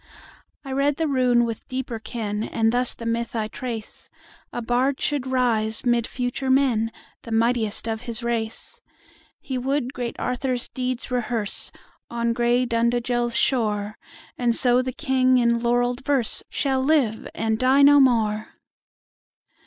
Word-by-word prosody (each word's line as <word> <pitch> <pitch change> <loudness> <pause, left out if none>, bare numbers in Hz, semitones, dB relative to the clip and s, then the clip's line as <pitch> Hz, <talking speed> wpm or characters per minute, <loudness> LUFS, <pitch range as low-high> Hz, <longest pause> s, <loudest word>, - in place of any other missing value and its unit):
I 270 - -6
read 275 +2 +1
the 320 +1 -1
rune 250 -3 +3
with 230 -2 -6
deeper 255 -3 -4
ken, 215 -2 -4
And 225 0 +1
thus 245 +1 +2
the 230 - -9
myth 235 +1 -2
I 220 -1 -1
trace:—A 235 +1 -8
bard 255 +4 +1
should 285 -3 -1
rise, 230 -4 +1
mid 240 -1 +2
future 250 +1 -3
men, 250 -4 +2 0.3
The 230 - -10
mightiest 225 -1 +1
of 220 -1 -2
his 235 -1 -2
race. 230 -2 -3 0.6
He 260 -2 -4
would 265 0 -1
great 240 -2 -4
Arthur's 250 0 -2
deeds 255 0 -3
rehearseOn 235 0 -4
gray 240 +1 +2
Dundagel's 240 0 0
shore; 210 -4 0 0.4
And 240 -2 +2
so 245 0 +3
the 255 0 -3
King 255 -2 +2
in 235 -1 +2
laurell'd 245 +2 0
verseShall 265 0 0
live, 265 -7 +1
and 220 0 -1
die 265 +2 +4
no 290 +1 +7
more! 220 -5 +2
240 Hz, 135 wpm, -23 LUFS, 230-255 Hz, 0.6 s, no